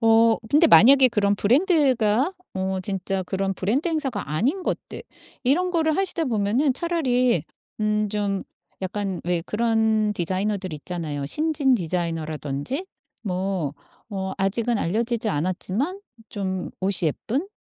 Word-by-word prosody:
어 225 0 +5
근데 315 +3 +5
만약에 265 +1 +8
그런 205 -3 +1
브랜드가 265 - +2 0.2
어 190 0 -1
진짜 190 0 -2
그런 195 +1 -1
브랜드 235 - 0
행사가 270 - -2
아닌 270 - 0
것들 - - -4 0.4
이런 345 +8 +2
거를 315 -2 +1
하시다 375 -4 0
보면은 235 +5 +1
차라리 255 -6 +1 0.4
음 210 0 +1
좀 200 -2 -1 0.4
약간 190 -1 -3
왜 175 -1 0
그런 220 -1 +1
디자이너들이 185 -1 -2
있잖아요, 150 -3 -4
신진 300 - +2
디자이너라든지. 165 - -3 0.4
뭐 185 -6 -2 0.4
어 190 -1 -3
아직은 220 +4 0
알려지지 225 +5 -1
않았지만 190 - -2 0.3
좀 190 -3 -3
옷이 190 0 +2
예쁜 255 - -3
210 Hz, 285 characters per minute, -24 LUFS, 190-260 Hz, 0.4 s, 만약에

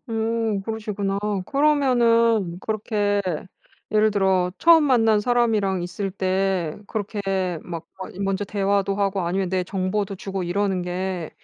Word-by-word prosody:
음 225 -2 -1
그러시구나. 210 -2 -3 0.3
그러면은 235 - +3
그렇게 205 -1 0 0.7
예를 215 0 +3
들어 190 -3 +1
처음 330 -2 +6
만난 225 -6 +4
사람이랑 215 -5 +1
있을 195 +3 -4
때 190 -3 -1
그렇게 195 -4 -2
막 165 -2 -7
막 190 - -7
먼저 195 +1 -1
대화도 200 0 0
하고 200 -1 0
아니면 185 +2 -1
내 185 0 0
정보도 195 +2 -2
주고 195 0 -4
이러는 190 +1 0
게 180 -1 -3
200 Hz, 280 characters per minute, -23 LUFS, 190-220 Hz, 0.7 s, 처음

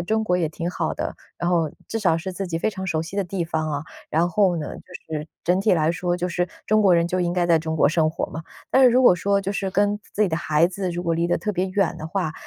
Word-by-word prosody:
中 220 +5 0
国 180 -3 +1
也 165 -3 0
挺 165 +3 -4
好 165 -2 -2
的， - - -4 0.2
然 175 0 -1
后 165 -3 +2 0.2
至 225 - -3
少 180 -7 +2
是 185 +3 -5
自 195 +1 -4
己 165 -2 -3
非 220 - 0
常 190 -2 -6
熟 160 -3 0
悉 170 +4 -8
的 200 - +1
地 180 -1 -3
方 160 -1 -2
哦， 145 0 -3 0.2
然 165 +3 +2
后 185 -2 +3
呢 150 - -4
就 175 -3 -10
是 150 - -8 0.2
整 180 +2 +2
体 210 - +3
来 160 0 +2
说， 175 0 -1
就 180 0 -2
是 175 0 -1 0.2
中 215 0 +3
国 195 -4 +5
人 170 0 +3
就 180 +1 -1
应 175 0 0
该 175 -1 +1
在 165 -2 +4
中 160 0 -3
国 145 - +4
生 160 -1 +2
活 160 - -2
嘛。 160 - -6 0.3
但 265 - +5
是 - - +9
如 250 +2 +4
果 245 - +7
说 200 +3 +1
就 195 0 -2
是 195 -1 -2
跟 205 +2 +1 0.2
自 215 - +2
己 205 - +3
的 160 - -1
孩 155 0 +3
子 185 +1 -3
如 175 0 -3
果 170 -1 0
离 170 +1 +1
得 175 - +1
特 210 +5 -3
别 185 0 0
远 195 -1 +1
的 155 - -5
话， 160 -2 -2
175 Hz, 320 characters per minute, -23 LUFS, 165-195 Hz, 0.3 s, 是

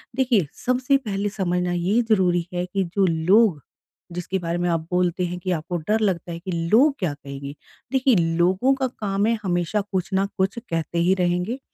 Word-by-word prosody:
देखिए, 245 - +2 0.2
सबसे 255 +2 +2
पहले 205 -5 -3
समझना 180 -3 -1
ये 185 +7 +1
ज़रूरी 180 -4 +2
है 175 0 -1
कि 190 +2 -1
जो 195 - +4
लोग 170 - +3 0.5
जिसके 180 +2 -3
बारे 170 0 -2
में 175 - -1
आप 165 - +1
बोलते 180 0 +1
हैं 180 0 -4
कि 185 +1 -3
आपको 175 +3 -4
डर 220 +1 +3
लगता 180 -5 -1
है 165 - -5
कि 185 +2 -6 0.2
लोग 275 +6 +5
क्या 175 -6 -1
कहेंगे? 140 0 -8 0.4
देखिए, 265 -2 +3 0.2
लोगों 190 +10 +3
का 265 -1 -1
काम 205 -4 -2
है 230 0 +2
हमेशा 175 +3 0
कुछ 190 -2 -3
न 190 +1 +2
कुछ 190 +4 0
कहते 165 -4 -4
ही 180 +2 +4
रहेंगे। 180 +8 0
185 Hz, 190 wpm, -23 LUFS, 175-215 Hz, 0.5 s, लोग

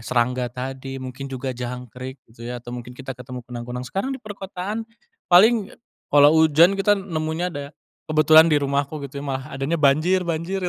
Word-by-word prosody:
serangga 125 0 0
tadi, 135 +1 -6
mungkin 130 +2 -7
juga 130 +1 -4
jangkrik 125 +1 -7
gitu 115 +1 -13
ya, 125 -1 -5
atau 120 - -9
mungkin 120 0 -8
kita 135 0 -6
ketemu 125 0 -8
kunang-kunang. 125 +1 -6
Sekarang 230 +8 -2
di - - -17
perkotaan, 205 +1 -5 0.5
paling 215 +3 +6
ya - - -16 0.4
kalo 145 0 +8
hujan, 160 +3 +6
kita 195 +1 +3
nemunya 165 -2 -2
ada 145 0 -7 0.4
kebetulan 155 +1 +6
di 150 - +4
rumahku 140 +2 -1
gitu 140 +1 -8
ya, - - -7
malah 130 -1 -3
adanya 135 +5 -1
banjir-banjir. 170 +4 +1
140 Hz, 170 wpm, -23 LUFS, 125-170 Hz, 0.5 s, kalo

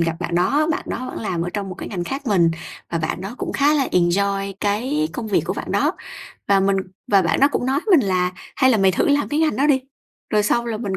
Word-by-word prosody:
gặp 165 -1 0
bạn 170 -1 -3
đó, 280 - +2
bạn 320 - -1
đó 255 +2 -4
bạn - - -7
làm 180 -6 -2
ở 175 - -3
trong 200 -2 -3
một 185 - -6
cái - - -7
ngành 175 -4 -4
khác 275 +7 -5
mình 180 -7 +3 0.4
và 170 - -1
bạn 155 +2 -3
đó 195 +6 -6
cũng - - -4
khá 290 +2 +3
là 275 -3 +1
enjoy 195 +2 +1
cái 260 +10 0
công 240 -3 -5
việc 200 - +2
của - - -2
bạn - - -5
đó. - - +2 0.6
Và 195 -1 +4
mình 195 0 +2 0.4
và 195 -1 +6
bạn 165 - 0
đó 280 - +6
cũng 250 - -1
nói 275 +3 +1
với 380 -5 +6
mình 240 -8 +2
là 180 -1 +1 0.2
"Hay 260 -1 +4
là 240 - +4
mày 190 -1 +4
thử - - +1
làm 285 0 +2
cái 295 +2 0
ngành 315 -1 +1
đó 280 +3 +2
đi," 270 -3 +3 0.5
rồi 210 -1 +3
sau 235 +3 +1
là 225 - -2
mình 205 -4 -3
205 Hz, 275 wpm, -21 LUFS, 185-270 Hz, 0.6 s, và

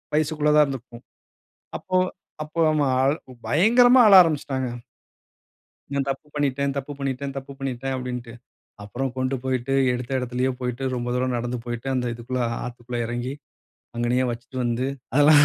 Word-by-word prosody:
வயசுக்குள்ள 150 -1 +2
தான் 150 - +8
இருந்திருப்போம். 125 -3 -7 0.8
அப்போ 185 - -2 0.5
அப்போ 155 +2 -4
அவன் 140 0 +2 0.3
பயங்கரமா 240 - +6
ஆழ 205 - +6
ஆரம்பிச்சுட்டாங்க. 140 -5 -1 1.3
"நான் 140 -1 0
தப்பு 135 +3 -5
பண்ணிட்டேன், 140 -1 0
தப்பு 140 +1 -4
பண்ணிட்டேன், 135 0 -3
தப்பு 135 +1 -6
பண்ணிட்டேன்" 135 0 -3
அப்படின்டு. 125 -2 -5 0.5
அப்புறம் 130 +6 -3
கொண்டு 130 +1 0
போய்ட்டு 130 0 -1 0.2
எடுத்த 125 +1 -4
இடத்திலயே 125 +1 -1
போய்ட்டு 125 +1 -3
ரொம்ப 120 0 -3
தூரம் 125 0 0
நடந்து 120 +1 -3
போய்ட்டு 120 +2 -4
அந்த 125 -1 0
இதுக்குள்ள 125 +2 -4 0.2
ஆத்துக்குள்ள 120 0 -6
எறங்கி, 120 +2 -3 0.6
அங்கநயே 120 +2 +1
வச்சுட்டு 120 +2 -8
வந்து 120 +2 0 0.3
அதெல்லாம் 145 +1 +7
130 Hz, 135 wpm, -24 LUFS, 125-140 Hz, 1.3 s, தான்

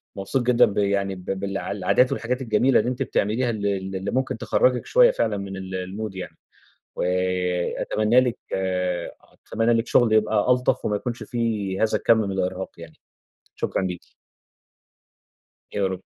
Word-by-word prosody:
مبسوط 100 +7 -1
جدًا 125 0 +5
ب 100 - -5
يعني 100 -1 +1
ب 90 - -12
بالع 95 +1 -3
العادات 105 +6 +2
والحاجات 125 +3 -2
الجميلة 120 +2 +3
اللي 125 - 0
أنتِ 130 +2 -2
بتعمليها 120 +2 0
ال 105 -3 -3
ال 95 -1 -2
اللي 95 +2 -3
ممكن 130 -2 -1
تخرّجِك 125 +1 +1
شوية - - +5
فعلًا 105 - -1
من 95 0 -6
ال 95 0 -6
المود 95 +2 -5
يعني. 95 - -7 0.6
و - - -2 0.8
أتمنى 110 +4 +3
لِك 125 -2 -1 1.1
أتمنى 115 +1 +2
لِك 115 0 +1
شغل 120 -3 +3
يبقى 110 +2 +2
ألطف 125 0 +2
وما 105 - 0
يكونش 120 +1 -5
في 110 -4 -2
هذا 110 - +2
الكم 115 -1 +4
من 100 -3 -1
الإرهاق 95 0 -2
يعني. - - -11 0.6
شكرًا - - -2
ليكِ. 90 -2 -5 1.6
يا 100 -2 0
رب. 95 -1 -3
105 Hz, 160 wpm, -24 LUFS, 95-120 Hz, 1.6 s, جدًا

